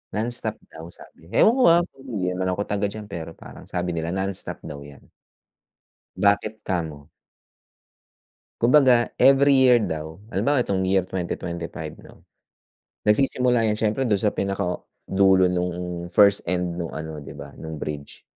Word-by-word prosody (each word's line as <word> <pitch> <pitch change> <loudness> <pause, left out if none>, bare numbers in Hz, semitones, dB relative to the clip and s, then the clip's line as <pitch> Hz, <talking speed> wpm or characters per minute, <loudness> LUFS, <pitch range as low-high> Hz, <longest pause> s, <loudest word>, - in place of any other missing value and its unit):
Nonstop 110 0 -3 0.2
daw 80 +1 -10
sabi. 85 -1 -16
Ewan 225 - +6
ko, - - +5
ah, 170 +1 +6 0.2
di 105 -9 -3
naman 95 0 -2
ako 100 - -2
taga 105 0 -1
diyan, 105 +1 -7
pero 85 -5 -7
parang - - -13
sabi 90 0 -2
nila 85 +1 -3
nonstop 95 0 -4
daw 70 - -7
'yan. 70 -1 -13 1.1
Bakit 100 +3 +1
kamo? 80 -6 -3 1.5
Kumbaga, 125 -1 +5
every 140 +1 +5
year 125 -2 +6
daw, 80 -3 -4
halimbawa 140 +1 +1
'etong 95 -5 0
year 95 +1 +3
2025 85 -3 -5
'no. - - -16 0.8
Nagsisimula 120 +1 +2
'yan 105 - 0
siyempre 110 +4 0
dun 105 - +3
sa 105 +1 0
pinakadulo 95 0 +1
nung 90 -1 -3
first 100 +2 +5
end 90 -1 -1
nung 85 - -3
ano, 80 -1 -6
di 70 - -10
ba, - - -9
nung 80 -1 -6
bridge. 75 -1 -7
95 Hz, 145 wpm, -24 LUFS, 85-110 Hz, 1.5 s, Ewan